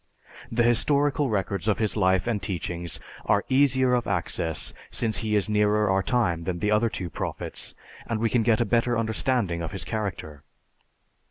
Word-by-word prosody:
The 120 Hz, +1 st, +2 dB
historical 140 Hz, +4 st, +2 dB
records 100 Hz, 0 st, -2 dB
of 105 Hz, -, +2 dB
his 110 Hz, -2 st, 0 dB
life 95 Hz, -3 st, +2 dB
and 115 Hz, -4 st, -1 dB
teachings 85 Hz, -2 st, -4 dB, 0.3 s
are 100 Hz, 0 st, +2 dB
easier 130 Hz, -1 st, +4 dB
of 120 Hz, -1 st, +1 dB
access 85 Hz, -3 st, -1 dB, 0.2 s
since 110 Hz, -5 st, 0 dB
he 110 Hz, -1 st, -1 dB
is 105 Hz, -, +2 dB
nearer 105 Hz, 0 st, +2 dB
our 95 Hz, 0 st, +2 dB
time 90 Hz, -7 st, 0 dB
than 90 Hz, 0 st, -2 dB
the 105 Hz, +4 st, 0 dB
other 105 Hz, +2 st, +3 dB
two 95 Hz, -4 st, -4 dB
prophets, -, -, -4 dB, 0.3 s
and 115 Hz, -2 st, -1 dB
we 115 Hz, -, +2 dB
can 120 Hz, -, +3 dB
get 110 Hz, -1 st, +3 dB
a 120 Hz, -, +2 dB
better 120 Hz, +2 st, +1 dB
understanding 110 Hz, -5 st, 0 dB
of 80 Hz, -, -5 dB
his 95 Hz, -, -3 dB
character. 95 Hz, -9 st, -4 dB
105 Hz, 175 wpm, -26 LUFS, 95-120 Hz, 0.3 s, easier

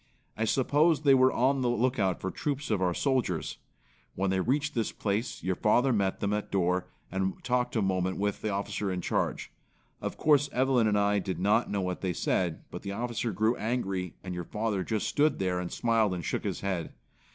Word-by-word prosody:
I 110 Hz, -, 0 dB
suppose 145 Hz, +6 st, +3 dB
they 140 Hz, -2 st, +6 dB
were 130 Hz, 0 st, +5 dB
on 130 Hz, +2 st, +2 dB
the 125 Hz, -, +1 dB
lookout 120 Hz, -6 st, +1 dB
for 95 Hz, -, -3 dB
troops 145 Hz, -3 st, -3 dB
of 105 Hz, -3 st, +1 dB
our 90 Hz, -2 st, +1 dB
soldiers. 130 Hz, -, -1 dB, 0.6 s
When 95 Hz, 0 st, 0 dB
they 95 Hz, -, +1 dB
reached 145 Hz, +9 st, 0 dB
this 115 Hz, -3 st, -1 dB
place, 105 Hz, +4 st, -2 dB
your 95 Hz, +1 st, +1 dB
father 120 Hz, +7 st, +3 dB
met 100 Hz, -3 st, 0 dB
them 100 Hz, 0 st, 0 dB
at 105 Hz, 0 st, -2 dB
door 90 Hz, -1 st, +1 dB, 0.2 s
and 95 Hz, 0 st, -1 dB
talked 125 Hz, 0 st, 0 dB
a 110 Hz, -, +2 dB
moment 95 Hz, -1 st, 0 dB
with 100 Hz, 0 st, -1 dB
the 110 Hz, -, -1 dB
officer 100 Hz, 0 st, -2 dB
in 90 Hz, -1 st, -2 dB
charge. -, -, -1 dB, 0.5 s
Of -, -, -4 dB
course 145 Hz, -2 st, +4 dB
Evelyn 130 Hz, -3 st, +3 dB
and 105 Hz, -1 st, +2 dB
I 100 Hz, 0 st, +3 dB
did 95 Hz, -1 st, -3 dB
not 105 Hz, +5 st, +2 dB
know 100 Hz, -1 st, -1 dB
what 90 Hz, -1 st, -3 dB
they 95 Hz, -2 st, -1 dB
said, 85 Hz, -1 st, -1 dB
but -, -, -6 dB
the 100 Hz, -, -5 dB
officer 120 Hz, +1 st, -2 dB
grew 110 Hz, +5 st, +1 dB
angry 95 Hz, -6 st, -2 dB
and 90 Hz, -2 st, -5 dB
your 90 Hz, -1 st, -4 dB
father 105 Hz, -3 st, -1 dB
just 110 Hz, +2 st, -1 dB
stood 150 Hz, +1 st, +2 dB
there 90 Hz, -2 st, 0 dB
and 90 Hz, -1 st, -4 dB
smiled 115 Hz, -5 st, +1 dB
and 85 Hz, -3 st, -5 dB
shook -, -, -2 dB
his -, -, -2 dB
head. 95 Hz, -4 st, -2 dB
105 Hz, 210 wpm, -29 LUFS, 95-125 Hz, 0.6 s, they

